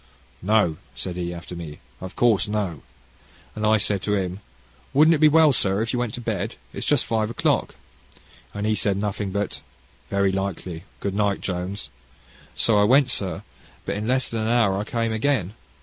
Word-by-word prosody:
"'No,' 100 -5 +2 0.2
said 90 - -5
he, 90 -1 -3
after 85 0 -8
me, 80 -3 -7 0.2
'of 95 0 -7
course, 115 -5 +3
no;' 100 -9 -2 0.7
and 105 0 -1
I 110 0 +5
said 105 -2 +1
to 105 +2 0
him, 95 -1 -2 0.6
'Wouldn't 155 +3 +6
it 155 - +1
be 155 - +8
well, 155 -1 +6
sir, 100 -1 +1
you 125 - -1
went 120 -3 -2
to 120 - -7
bed? 110 -1 -3 0.2
It's - - -4
just 145 -5 +3
five 110 -1 0
o'clock;' 115 - 0 0.8
and 105 0 -4
he 110 - +2
said 100 -2 +1
nothing, 100 0 -2
but, 100 +2 -3 0.5
'Very 100 -1 +2
likely; 95 -3 -4 0.2
good 100 - -2
night, 100 -1 +1
Jones.' 95 +2 -4 0.6
So 110 -3 +3
I - - +5
went, 130 +4 +4
sir, 95 -1 -2 0.4
but - - -1
in 105 +2 -3
less 130 +1 +2
than 115 -1 -3
an 110 - -1
hour 115 -4 +3
I 100 +2 -2
came 115 0 -1
again. 110 -5 0
105 Hz, 185 wpm, -24 LUFS, 95-115 Hz, 0.8 s, be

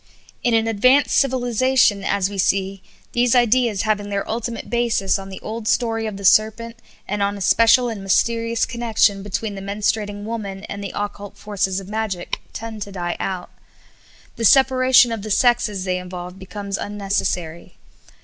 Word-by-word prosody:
In 240 -2 +2
an 225 0 +2
advanced 255 +6 +3
civilization, 255 -5 +2
as 195 -1 +1
we 200 -1 -6
see, 195 +1 0 0.3
these 245 0 +2
ideas 240 -3 +2
having 205 -2 -1
their 200 -1 -2
ultimate 230 +1 -4
basis 230 -5 0
on 195 0 -9
the 190 - -8
old 220 0 -6
story 225 -2 0
of 210 -2 -5
the 200 - -6
serpent, 220 +3 +3 0.3
and 205 +1 -2
on 200 0 0
a - - -8
special 230 +5 +4
and 225 -4 -5
mysterious 230 +4 +1
connection 225 -4 +1
between 205 +2 -4
the 195 - -7
menstruating 205 +1 -2
woman 205 -3 -5
and 200 -1 -7
the 200 - -5
occult 205 0 -5
forces 200 -2 -2
of 195 - -10
magic, 210 -4 -3
tend 220 -1 -7
to 200 - -5
die 175 -2 -3
out. 185 -2 -4 0.9
The 230 - -4
separation 260 -1 +5
of 225 -2 -3
the 215 - -7
sexes 215 -3 +2
they 185 -1 -1
involve 180 0 -8
becomes 200 +1 -5
unnecessary. 195 -5 -3
210 Hz, 165 wpm, -21 LUFS, 195-230 Hz, 0.9 s, separation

